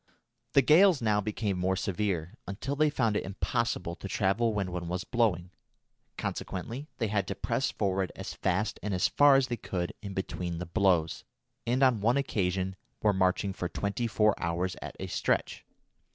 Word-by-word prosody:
The 140 Hz, -, +6 dB
gales 170 Hz, +3 st, +6 dB
now 105 Hz, -2 st, +2 dB
became 105 Hz, -2 st, -2 dB
more 95 Hz, +1 st, +1 dB
severe, 95 Hz, -2 st, -2 dB
until 115 Hz, +8 st, -3 dB
they 155 Hz, +1 st, +3 dB
found 115 Hz, -7 st, +1 dB
it -, -, 0 dB
impossible 100 Hz, -2 st, -2 dB
to -, -, -7 dB
travel 105 Hz, +4 st, +1 dB
when 100 Hz, -3 st, -2 dB
one 90 Hz, -1 st, -4 dB
was 90 Hz, +2 st, -2 dB
blowing. 95 Hz, -8 st, 0 dB, 0.7 s
Consequently 110 Hz, +6 st, -4 dB
they 115 Hz, -, 0 dB
had 100 Hz, -3 st, 0 dB
to 100 Hz, -, -3 dB
press 120 Hz, +6 st, -1 dB
forward 95 Hz, -2 st, -1 dB
as -, -, -6 dB
fast -, -, -1 dB
and 100 Hz, 0 st, -2 dB
as 90 Hz, -, +3 dB
far 145 Hz, -1 st, +6 dB
as 135 Hz, -1 st, +4 dB
they 120 Hz, -2 st, -3 dB
could 90 Hz, -5 st, -3 dB
in 100 Hz, -2 st, -7 dB
between 90 Hz, -3 st, -3 dB
the 90 Hz, -, -4 dB
blows, 85 Hz, -2 st, +1 dB, 0.4 s
and 125 Hz, +3 st, +2 dB
on 125 Hz, -5 st, +4 dB
one 120 Hz, +6 st, +3 dB
occasion 95 Hz, -7 st, -1 dB, 0.3 s
were 105 Hz, -1 st, +4 dB
marching 95 Hz, +1 st, +1 dB
for 90 Hz, -1 st, -3 dB
twenty 100 Hz, +5 st, -2 dB
four 105 Hz, -1 st, +3 dB
hours 85 Hz, +2 st, -1 dB
at -, -, -7 dB
a -, -, -3 dB
stretch. -, -, -1 dB
100 Hz, 180 wpm, -29 LUFS, 90-115 Hz, 0.7 s, The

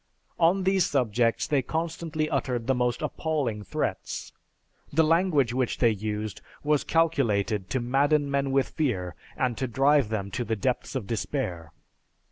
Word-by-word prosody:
On 180 Hz, +3 st, +4 dB
these 190 Hz, 0 st, +3 dB
subjects, 120 Hz, -3 st, +1 dB
they 145 Hz, -3 st, +2 dB
constantly 160 Hz, +1 st, -2 dB
uttered 125 Hz, -5 st, -1 dB
the 135 Hz, -, +2 dB
most 125 Hz, +2 st, 0 dB
appalling 145 Hz, -8 st, -1 dB
threats. 95 Hz, -, -3 dB, 0.6 s
The 160 Hz, +3 st, +4 dB
language 155 Hz, -6 st, +3 dB
which 125 Hz, -1 st, 0 dB
they 120 Hz, -2 st, +4 dB
used 105 Hz, 0 st, -4 dB, 0.2 s
was 150 Hz, -1 st, +2 dB
calculated 115 Hz, -, +1 dB
to 130 Hz, -, 0 dB
madden 140 Hz, +4 st, +2 dB
men 140 Hz, 0 st, +1 dB
with 135 Hz, 0 st, +2 dB
fear 95 Hz, -, -1 dB, 0.2 s
and 125 Hz, -2 st, 0 dB
to 130 Hz, -, 0 dB
drive 135 Hz, +1 st, +3 dB
them 100 Hz, -3 st, -3 dB
to 125 Hz, -, -2 dB
the 115 Hz, -1 st, -1 dB
depths 125 Hz, +5 st, -2 dB
of 125 Hz, -6 st, -2 dB
despair. 95 Hz, -, -3 dB
130 Hz, 150 wpm, -27 LUFS, 115-150 Hz, 0.6 s, On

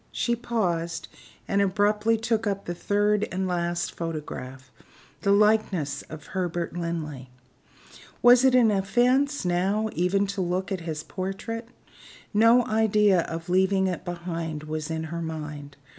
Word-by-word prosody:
She 235 Hz, -, 0 dB
paused, 175 Hz, -9 st, -2 dB, 0.4 s
and 200 Hz, 0 st, +2 dB
abruptly 210 Hz, +3 st, +2 dB
took 225 Hz, -1 st, 0 dB
up 200 Hz, -1 st, -2 dB
the 175 Hz, -, -3 dB
third 205 Hz, +3 st, +1 dB
and 185 Hz, +1 st, -1 dB
last 175 Hz, -1 st, -1 dB
photograph 135 Hz, -5 st, -6 dB, 0.5 s
the 200 Hz, -, +2 dB
likeness 200 Hz, -9 st, +2 dB
of 155 Hz, -1 st, -9 dB
Herbert 175 Hz, -2 st, -2 dB
Linley. 155 Hz, -6 st, -4 dB, 0.9 s
Was 245 Hz, +1 st, +7 dB
it 260 Hz, -1 st, +5 dB
an 235 Hz, -4 st, +5 dB
offense, 245 Hz, +8 st, +2 dB
now, 195 Hz, +5 st, +1 dB
even 185 Hz, +3 st, +1 dB
to 195 Hz, 0 st, -3 dB
look 185 Hz, +3 st, -2 dB
at 190 Hz, -2 st, -2 dB
his 155 Hz, -1 st, -4 dB
portrait? 215 Hz, +5 st, -5 dB, 0.6 s
No 230 Hz, +3 st, +5 dB
idea 210 Hz, -4 st, +3 dB
of 165 Hz, +1 st, -6 dB
leaving 190 Hz, +1 st, +2 dB
it 185 Hz, -2 st, -2 dB
behind 170 Hz, -3 st, -4 dB
her 155 Hz, -, -11 dB
was 155 Hz, 0 st, -3 dB
in 160 Hz, 0 st, -2 dB
her 170 Hz, -, -3 dB
mind. 150 Hz, -3 st, -6 dB
190 Hz, 145 wpm, -26 LUFS, 165-215 Hz, 0.9 s, Was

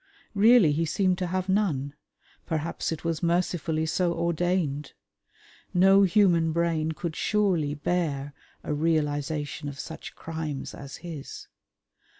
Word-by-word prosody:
Really 215 Hz, -4 st, +6 dB
he 155 Hz, +3 st, +1 dB
seemed 185 Hz, +3 st, +1 dB
to 180 Hz, -, -1 dB
have 185 Hz, +1 st, -2 dB
none; 165 Hz, -9 st, 0 dB, 0.5 s
perhaps 160 Hz, 0 st, -2 dB
it 160 Hz, -, -5 dB
was 165 Hz, -1 st, -1 dB
mercifully 170 Hz, -2 st, 0 dB
so 170 Hz, +2 st, 0 dB
ordained. 170 Hz, -4 st, -1 dB, 0.8 s
No 195 Hz, +2 st, +6 dB
human 175 Hz, -4 st, +4 dB
brain 160 Hz, -1 st, 0 dB
could 160 Hz, 0 st, -5 dB
surely 180 Hz, -9 st, +1 dB
bear 145 Hz, -3 st, -1 dB, 0.3 s
a -, -, -2 dB
realisation 150 Hz, -2 st, -1 dB
of 140 Hz, -, -9 dB
such 160 Hz, -, -8 dB
crimes 160 Hz, -4 st, -5 dB
as 140 Hz, 0 st, -9 dB
his. 155 Hz, -5 st, -8 dB
165 Hz, 125 wpm, -27 LUFS, 150-180 Hz, 0.8 s, Really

